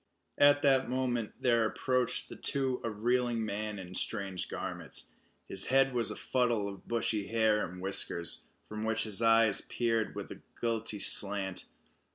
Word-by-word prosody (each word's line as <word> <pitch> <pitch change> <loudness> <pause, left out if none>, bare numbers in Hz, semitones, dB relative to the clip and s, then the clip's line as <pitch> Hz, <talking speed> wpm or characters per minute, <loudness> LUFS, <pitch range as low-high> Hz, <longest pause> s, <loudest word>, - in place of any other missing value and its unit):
At 145 0 +5
that 135 -3 +2
moment 125 -3 -2
there 115 -2 +2
approached 125 +2 -1
the - - -10
two 130 -2 -2
a 115 - -2
reeling 120 +1 -1
man 105 0 -4
in 90 -1 -9
strange 95 -1 -4
garments. - - -3 0.3
His 95 - +5
head 135 0 +2
was 120 -2 0
a - - -4
fuddle 120 -5 -1
of 100 -1 -10
bushy 115 -3 0
hair 110 -2 +1
and 90 +1 -11
whiskers, 90 -2 +2 0.2
from 110 0 -7
which 110 0 0
his 110 -1 +3
eyes 115 -2 +4
peered 115 -3 -2
with - - -7
a - - -10 0.2
guilty 115 -2 -2
slant. 100 -2 +3
115 Hz, 160 wpm, -30 LUFS, 105-125 Hz, 0.3 s, At